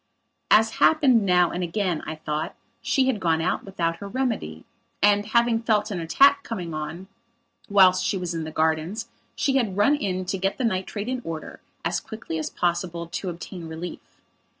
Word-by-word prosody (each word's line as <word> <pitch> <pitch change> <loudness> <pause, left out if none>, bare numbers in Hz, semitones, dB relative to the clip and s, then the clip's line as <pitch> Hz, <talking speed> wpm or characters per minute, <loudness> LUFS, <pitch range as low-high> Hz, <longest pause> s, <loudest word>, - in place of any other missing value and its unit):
As 220 +1 +5
happened 260 -10 +4
now 180 -1 +4
and 180 - -3
again, 175 -1 -1
I 155 - -4
thought, 155 0 -4 0.3
she 265 - +2
had 260 -5 0
gone 165 -3 +1
out 165 - -1
without 170 -4 -2
her 200 - -7
remedy 205 - -3 0.3
and, 205 0 +3
having 235 0 +2
felt 215 -2 +1
an 185 - -2
attack 280 +12 +5
coming 180 - -5
on 155 +5 -5 0.6
whilst 185 -2 +5
she 195 - 0
was 180 -2 -3
in 165 -1 -3
the 155 - -5
gardens, 160 +9 -1 0.3
she 270 -1 +1
had 215 -7 -1
run 245 +9 +4
in 185 -9 -2
to 190 +1 -2
get 195 +1 -1
the 260 - -2
nitrate 205 0 -2
in 255 0 -2
order, 160 -1 -6 0.3
as - - 0
quickly 220 -8 -6
as 155 - -3
possible, 175 -1 -1
to 185 - -4
obtain 170 0 -7
relief. 160 +2 -8
185 Hz, 180 wpm, -25 LUFS, 165-220 Hz, 0.6 s, As